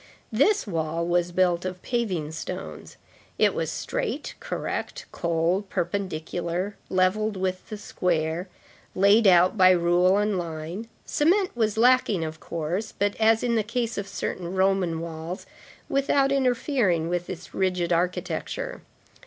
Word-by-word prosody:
This 390 Hz, -, +3 dB
wall 165 Hz, -3 st, -2 dB
was 175 Hz, 0 st, +1 dB
built 175 Hz, -1 st, +2 dB
of 185 Hz, 0 st, -4 dB
paving 190 Hz, -11 st, -1 dB
stones. 160 Hz, -, -7 dB, 0.4 s
It -, -, +4 dB
was -, -, -2 dB
straight, -, -, -3 dB
correct, -, -, -4 dB
cold, 170 Hz, +4 st, 0 dB
perpendicular, 175 Hz, +1 st, -2 dB
levelled 195 Hz, +3 st, +1 dB
with 185 Hz, 0 st, -3 dB
the 215 Hz, -, -5 dB
square, 175 Hz, -3 st, -1 dB, 0.5 s
laid 200 Hz, +3 st, +5 dB
out 185 Hz, +3 st, +5 dB
by 185 Hz, 0 st, +8 dB
rule 180 Hz, +1 st, +4 dB
and 205 Hz, -2 st, +1 dB
line. 170 Hz, +5 st, -5 dB, 0.2 s
Cement 365 Hz, +4 st, +2 dB
was 220 Hz, -3 st, 0 dB
lacking, 235 Hz, -6 st, +4 dB
of 155 Hz, 0 st, -6 dB
course, 170 Hz, +6 st, -3 dB
but, 205 Hz, 0 st, +1 dB
as 225 Hz, 0 st, +3 dB
in 240 Hz, -1 st, +1 dB
the 225 Hz, -, +3 dB
case 235 Hz, +2 st, -2 dB
of 200 Hz, -1 st, -4 dB
certain 185 Hz, -2 st, -4 dB
Roman 190 Hz, -4 st, +1 dB
walls, 165 Hz, +3 st, -6 dB, 0.4 s
without 275 Hz, 0 st, +2 dB
interfering 250 Hz, -, +1 dB
with 175 Hz, 0 st, -2 dB
its 180 Hz, -1 st, -8 dB
rigid 180 Hz, -2 st, 0 dB
architecture. 180 Hz, -, -2 dB
185 Hz, 135 wpm, -25 LUFS, 170-220 Hz, 0.5 s, by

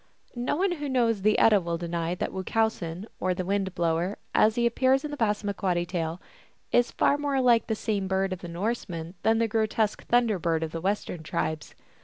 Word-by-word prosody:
No 245 Hz, 0 st, -1 dB
one 375 Hz, +4 st, +1 dB
who 295 Hz, -5 st, -3 dB
knows 230 Hz, -5 st, +1 dB
the 215 Hz, +2 st, +3 dB
Edda 210 Hz, -3 st, +5 dB
will 170 Hz, -1 st, -2 dB
deny 170 Hz, 0 st, -2 dB
that -, -, -3 dB
Wu 190 Hz, -, -3 dB
chowsen, 195 Hz, -5 st, -1 dB
or 185 Hz, 0 st, 0 dB
the 185 Hz, -, -3 dB
Wind 195 Hz, -1 st, -1 dB
blower, 170 Hz, +3 st, 0 dB, 0.2 s
as 215 Hz, 0 st, +4 dB
he 240 Hz, -, +1 dB
appears 260 Hz, +4 st, +2 dB
in 300 Hz, -, -5 dB
the -, -, -3 dB
Passamaquoddy 200 Hz, -5 st, 0 dB
tale, 170 Hz, -1 st, -3 dB, 0.5 s
is 245 Hz, 0 st, +3 dB
far 285 Hz, -, +2 dB
more 285 Hz, -2 st, 0 dB
like 240 Hz, -3 st, +4 dB
the 220 Hz, -, 0 dB
same 210 Hz, -3 st, -2 dB
bird 190 Hz, 0 st, 0 dB
of 185 Hz, -, -6 dB
the 175 Hz, -, -8 dB
Norsemen 170 Hz, -2 st, -3 dB
than 225 Hz, 0 st, +3 dB
the 230 Hz, 0 st, +2 dB
grotesque 220 Hz, -1 st, 0 dB
Thunder 235 Hz, -5 st, +3 dB
Bird 165 Hz, -1 st, 0 dB
of 160 Hz, -, -4 dB
the 165 Hz, -, -5 dB
Western 190 Hz, -3 st, -2 dB
tribes. 155 Hz, 0 st, -3 dB
200 Hz, 205 wpm, -27 LUFS, 175-230 Hz, 0.5 s, Edda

